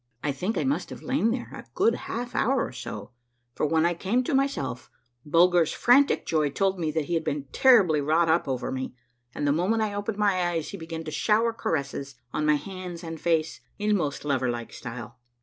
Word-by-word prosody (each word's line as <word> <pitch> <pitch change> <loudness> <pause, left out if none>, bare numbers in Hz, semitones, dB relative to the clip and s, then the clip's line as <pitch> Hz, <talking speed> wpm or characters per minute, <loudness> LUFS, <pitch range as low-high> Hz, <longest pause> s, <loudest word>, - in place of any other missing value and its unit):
I 150 - +1
think 180 +11 -2
I - - +1
must 275 +2 -1
have - - -9
lain 260 -4 +1
there 240 +1 -3
a - - -9
good 230 - +3
half 240 +1 -5
hour 260 +1 +2
or - - -7
so; 125 0 -7 0.4
for 150 - 0
when 160 +1 +2
I 175 - +2
came 200 +9 0
to 255 - -2
myself 270 - -1 0.3
Bulger's 170 +1 +4
frantic 270 +4 +4
joy 155 -3 +1
told 190 +5 0
me 160 -2 0
that 155 -1 -1
he 175 - -3
had 165 -1 +1
been 145 -2 -2
terribly 200 - +5
wrought 160 +4 +2
up 160 0 +2
over 130 -2 -2
me, 130 -1 -4 0.4
and 145 - -2
the - - +4
moment 190 +9 +1
I 210 -1 -2
opened 205 +1 -3
my 200 -3 +2
eyes 165 -3 -2
he 200 - -6
began 165 -1 -6
to 155 - -6
shower 225 +6 +2
caresses 140 -7 -3 0.2
on 150 - 0
my 150 - +5
hands 180 +2 -6
and 165 -2 -7
face 165 -2 0 0.2
in 210 0 +1
most 150 -6 -2
lover 130 -3 +1
like 120 -1 -4
style. 120 -2 -8
170 Hz, 215 wpm, -26 LUFS, 150-210 Hz, 0.4 s, terribly